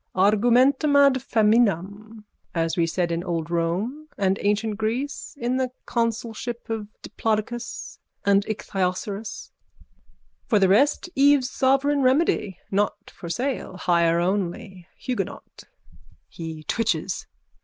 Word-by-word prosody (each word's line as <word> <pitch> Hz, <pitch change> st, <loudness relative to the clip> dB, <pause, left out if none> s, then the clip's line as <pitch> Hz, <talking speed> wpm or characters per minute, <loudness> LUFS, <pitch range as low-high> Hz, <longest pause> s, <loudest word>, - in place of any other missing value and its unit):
Argumentum 245 Hz, +9 st, +4 dB
ad 280 Hz, -1 st, +7 dB
feminam, 215 Hz, -2 st, +1 dB, 0.3 s
as 165 Hz, -1 st, 0 dB
we 170 Hz, -2 st, +2 dB
said 170 Hz, 0 st, -1 dB
in 170 Hz, +1 st, -1 dB
old 170 Hz, -2 st, -3 dB
Rome 190 Hz, -, -1 dB
and 195 Hz, -1 st, +1 dB
ancient 210 Hz, +1 st, 0 dB
Greece 235 Hz, +7 st, -3 dB
in 245 Hz, +1 st, 0 dB
the 260 Hz, -1 st, 0 dB, 0.2 s
consulship 230 Hz, 0 st, -3 dB
of 220 Hz, -2 st, -3 dB, 0.2 s
Diplodocus 225 Hz, +2 st, -3 dB, 0.3 s
and 200 Hz, 0 st, +4 dB
Ichthyosauros. 200 Hz, 0 st, -3 dB, 1.0 s
For 220 Hz, -, +3 dB
the 195 Hz, -2 st, +4 dB
rest 275 Hz, -, +3 dB
Eve's 275 Hz, -2 st, +4 dB
sovereign 275 Hz, +2 st, +2 dB
remedy. 255 Hz, -, +2 dB
Not 205 Hz, +1 st, -1 dB
for 170 Hz, -, -9 dB
sale. 245 Hz, -2 st, -3 dB
Hire 170 Hz, -2 st, +2 dB
only. 185 Hz, 0 st, -2 dB
Huguenot. 250 Hz, -2 st, -5 dB, 0.7 s
_(He 160 Hz, -2 st, -7 dB
twitches.) 230 Hz, +5 st, -1 dB
215 Hz, 110 wpm, -24 LUFS, 185-245 Hz, 1.0 s, ad